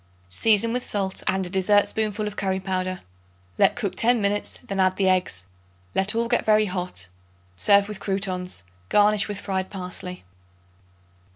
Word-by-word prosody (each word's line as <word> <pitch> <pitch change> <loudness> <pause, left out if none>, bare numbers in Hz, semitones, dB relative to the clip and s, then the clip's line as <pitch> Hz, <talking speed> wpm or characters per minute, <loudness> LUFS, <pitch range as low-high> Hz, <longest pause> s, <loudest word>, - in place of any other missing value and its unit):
Season 220 - +2
with 250 0 -2
salt 195 -2 -2
and 190 0 +1
a - - -2
dessertspoonful 205 +2 +2
of 210 -1 -5
curry 190 -1 -1
powder. 185 -1 -3 0.6
Let - - +4
cook 200 - -2
ten 240 +1 +2
minutes; 205 0 0
then 195 -1 -4
add 185 0 +2
the 195 - +2
eggs. 180 - 0 0.5
Let 195 +3 +1
all 230 0 +1
get 240 - +1
very 215 0 +4
hot. 180 - -4 0.5
Serve 200 - +4
with 210 -2 -5
croutons; 185 - -1 0.3
garnish 210 0 +4
with 205 -1 -4
fried 190 -2 -3
parsley. 180 -1 -6
195 Hz, 155 wpm, -24 LUFS, 185-210 Hz, 0.6 s, Let